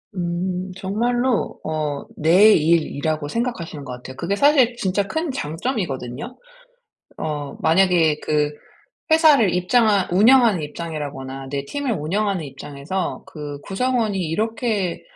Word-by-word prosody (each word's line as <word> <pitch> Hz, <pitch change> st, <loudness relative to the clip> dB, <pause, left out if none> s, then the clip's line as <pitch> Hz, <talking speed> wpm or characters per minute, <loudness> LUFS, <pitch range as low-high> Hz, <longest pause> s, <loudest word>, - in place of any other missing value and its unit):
음. 180 Hz, +1 st, -2 dB
정말로 240 Hz, +5 st, -1 dB
어 150 Hz, -2 st, -3 dB
내 180 Hz, +8 st, +6 dB
일이라고 155 Hz, -2 st, +1 dB
생각하시는 180 Hz, -, -3 dB
것 125 Hz, -, -6 dB
같아요. 125 Hz, +1 st, -9 dB
그게 175 Hz, +7 st, -1 dB
사실 265 Hz, -1 st, +4 dB
진짜 200 Hz, -3 st, 0 dB
큰 320 Hz, +3 st, -2 dB
장점이거든요. 165 Hz, -, -4 dB, 0.8 s
어 150 Hz, -2 st, -4 dB
만약에 165 Hz, -2 st, +3 dB
그 150 Hz, -1 st, 0 dB, 0.6 s
회사를 295 Hz, -, +5 dB
입장하 200 Hz, +2 st, +2 dB
운영하는 220 Hz, 0 st, +5 dB
입장이라거나 145 Hz, -4 st, -6 dB
내 140 Hz, 0 st, -3 dB
팀을 285 Hz, -, -3 dB
운영하는 190 Hz, +2 st, -1 dB
입장에서 145 Hz, +6 st, -5 dB
그 145 Hz, -2 st, -7 dB
구성원이 225 Hz, 0 st, -1 dB
이렇게 210 Hz, +2 st, -1 dB
180 Hz, 285 characters per minute, -21 LUFS, 150-225 Hz, 0.8 s, 내